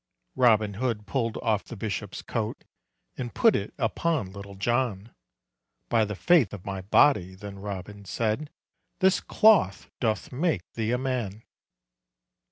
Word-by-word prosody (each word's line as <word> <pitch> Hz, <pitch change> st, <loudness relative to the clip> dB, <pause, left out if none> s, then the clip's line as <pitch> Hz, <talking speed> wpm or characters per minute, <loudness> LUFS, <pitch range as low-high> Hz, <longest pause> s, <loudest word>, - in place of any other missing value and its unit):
Robin 110 Hz, -4 st, +4 dB
Hood 115 Hz, -5 st, -1 dB
pull'd 115 Hz, -2 st, -1 dB
off 110 Hz, -2 st, +1 dB
the 120 Hz, -, -9 dB
bishop's 100 Hz, -2 st, -4 dB
coat, -, -, -3 dB, 0.5 s
And 120 Hz, -2 st, -5 dB
put 225 Hz, -2 st, +5 dB
it 100 Hz, -, -2 dB
upon 135 Hz, -, 0 dB
Little 100 Hz, 0 st, -9 dB
John; 115 Hz, 0 st, -1 dB, 0.8 s
"By 115 Hz, -2 st, +3 dB
the 105 Hz, 0 st, -5 dB
faith 150 Hz, -, +4 dB
of 95 Hz, -, -12 dB
my 95 Hz, -1 st, -4 dB
body," 95 Hz, -2 st, +3 dB
then 100 Hz, 0 st, -9 dB
Robin 100 Hz, 0 st, -7 dB
said, 115 Hz, +9 st, -1 dB, 0.5 s
"This 190 Hz, 0 st, +3 dB
cloth 205 Hz, -, +3 dB
doth 110 Hz, -3 st, -1 dB
make 155 Hz, +5 st, 0 dB
thee 110 Hz, -1 st, -2 dB
a 125 Hz, -, +2 dB
man." 120 Hz, -5 st, -3 dB
110 Hz, 140 wpm, -27 LUFS, 100-130 Hz, 0.8 s, put